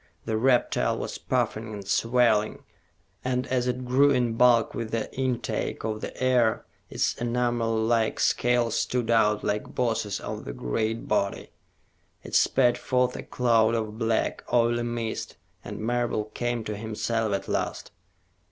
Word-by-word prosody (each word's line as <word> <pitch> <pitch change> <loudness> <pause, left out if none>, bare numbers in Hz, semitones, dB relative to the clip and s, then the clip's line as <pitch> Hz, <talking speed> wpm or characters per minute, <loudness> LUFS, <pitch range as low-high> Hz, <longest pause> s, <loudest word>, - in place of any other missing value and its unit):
The 110 - -1
reptile 125 +2 +2
was - - -5
puffing 110 +1 -1
and 100 -2 -8
swelling, 115 0 +2 0.6
and 125 0 -1
as 125 -1 0
it 125 0 -2
grew 135 +3 +4
in 125 -4 +2
bulk 120 -1 +4
with 115 -2 -4
the 115 -1 -3
intake 130 -2 -2
of 110 -1 -3
the - - -7
air, 125 -3 +2 0.2
its - - 0
enamel 120 -1 0
like 110 0 +1
scales 120 -2 +2
stood 120 -1 0
out 105 -2 +3
like 105 +1 -2
bosses 115 -5 -1
on - - -6
the - - -6
great 110 - -2
body. 100 -2 -1 0.7
It - - -10
spat 125 -2 +3
forth 125 -1 +1
a - - -5
cloud 115 -2 +2
of 110 -1 -3
black, 115 -1 0
oily 120 0 +3
mist, 120 -1 -4 0.3
and - - -7
Marable 120 -1 -1
came 120 -1 -2
to 105 -1 -4
himself 110 +1 -2
at 100 - -5
last. - - -3
115 Hz, 150 wpm, -26 LUFS, 110-125 Hz, 0.7 s, grew